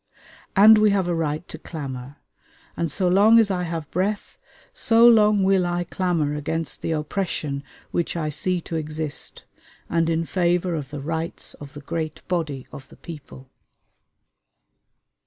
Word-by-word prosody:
And 215 +2 +8
we 215 0 +5
have 195 -3 +1
a 175 - 0
right 160 0 -2
to 160 - -9
clamor; 135 -5 -7 0.6
and 170 - -1
so 185 +5 0
long 205 +5 +6
as 220 -3 +4
I 180 -1 -1
have 165 -3 -4
breath, 200 +4 -2 0.3
so 230 +1 +5
long 210 -3 +5
will 190 -1 +3
I 175 0 -1
clamor 170 -4 -1
against 150 0 -3
the - - -3
oppression 150 -3 -3 0.3
which 170 0 -1
I 155 -2 -1
see 175 +4 -1
to 165 - -6
exist, 155 -1 -3 0.5
and 165 0 +2
in 165 0 0
favor 175 0 +1
of 145 -5 -4
the 145 -1 -6
rights 160 +3 -3
of 145 -1 -12
the 145 - -8
great 155 +2 -5
body 155 -7 -2
of 135 -1 -10
the - - -16
people.... 140 -5 -11
165 Hz, 155 wpm, -23 LUFS, 150-185 Hz, 0.6 s, And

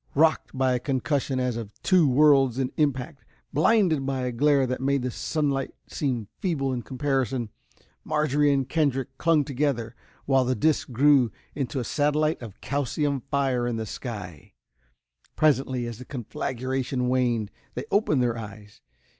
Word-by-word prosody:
Rocked 155 -2 +2
by 130 -1 +2
a 125 - 0
concussion 135 0 -1
as 125 -2 0
of 115 -3 -5
two 180 -6 +4
worlds 135 -2 +5
in 130 -1 -1
impact, 140 -1 -1 0.3
blinded 165 - +3
by 135 -1 -2
a 125 0 -1
glare 140 +2 +3
that 130 0 -3
made 140 -1 +1
the 125 - -2
sunlight 140 -1 -1
seem 125 -7 -2
feeble 140 -8 -1
in 125 - -2
comparison. 130 -3 -1 0.5
Marjorie 150 -1 +2
and 135 -2 +1
Kendrick 135 -4 0
clung 165 -3 +3
together, 125 -5 -1 0.3
while 135 -1 +3
the 130 +1 0
disc 155 +6 +1
grew 135 -1 +4 0.2
into 135 -1 -3
a - - -2
satellite 150 +4 +1
of 110 -4 -10
calcium 140 0 -1
fire 130 -3 +1
in 120 - -1
the 110 0 -3
sky. 100 - -7 0.8
Presently, 130 -5 +2
as 120 -1 -6
the 125 - -9
conflagration 130 +1 -3
waned, 120 -5 +1 0.2
they - - -4
opened 150 - +2
their 120 -1 0
eyes. 105 -1 -11
135 Hz, 155 wpm, -26 LUFS, 125-145 Hz, 0.8 s, worlds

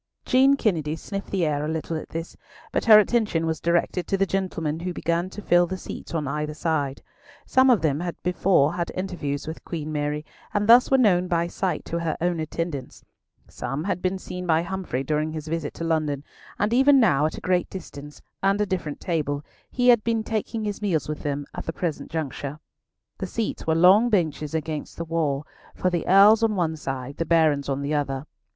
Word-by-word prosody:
Jean 270 +2 +5
Kennedy 160 - 0
sniffed 195 +4 -6
the 185 -4 0
air 150 -1 0
a - - -2
little 160 +1 -3
at 155 - -6
this, 165 +1 -6 0.4
but - - -1
her 220 -2 +9
attention 215 -6 +2
was 160 -1 -1
directed 170 +1 0
to 195 - +1
the 195 - +2
gentlemen 165 -5 -2
who 180 +1 -3
began 170 +2 -1
to 210 +2 -9
fill 175 0 +4
the 185 +2 -4
seats 175 - -8
on 150 -3 -1
either 150 +2 -3
side. 145 -4 -1 0.4
Some 260 0 +4
of 235 -8 +4
them 145 -2 +1
had 175 0 -3
before 180 -4 +3
had 170 -1 -3
interviews 175 -7 -3
with 160 +1 -7
Queen 155 -3 -5
Mary, 150 0 -2 0.3
and 205 0 +1
thus 240 +2 +7
were 270 - +5
known 185 -7 +3
by 170 -1 +1
sight 175 -1 -2
to 170 - -3
her 165 -1 -2
own 175 0 0
attendants; 155 -3 -4 0.4
some 135 +5 -4
had 190 -1 -2
been 185 +1 0
seen 180 -1 -7
by 160 0 +3
Humfrey 175 -8 -3
during 155 +2 -1
his 155 -1 -6
visit 160 -2 -3
to - - -5
London; 155 -4 0 0.3
and 210 +2 0
even 270 +2 +6
now 150 - +4
at - - -6
a - - -5
great 180 -1 0
distance, 150 -6 -9 0.2
and 195 +1 +2
a 210 - +2
different 180 -6 -3
table, 150 -4 -2 0.2
he 250 0 +2
had 235 -3 +6
been 225 -1 0
taking 220 0 -3
his 205 0 -4
meals 180 -7 0
with 150 0 -4
them 145 -1 -3
at - - -7
the 165 - -2
present 165 -4 -3
juncture. 150 -2 -4 0.6
The - - -3
seats 225 -7 -3
were 160 - +3
long 190 +8 +6
benches 160 -6 0
against 155 -1 -4
the 170 - -4
wall, 155 -3 -1 0.3
for 185 - 0
the 175 -2 -2
Earls 205 +4 +7
on 225 -2 +2
one 165 -4 0
side, 135 -2 -5
the - - 0
Barons 155 -4 +2
on 140 +1 -1
the 145 +2 -2
other. 140 -2 -1
165 Hz, 210 wpm, -24 LUFS, 150-190 Hz, 0.6 s, her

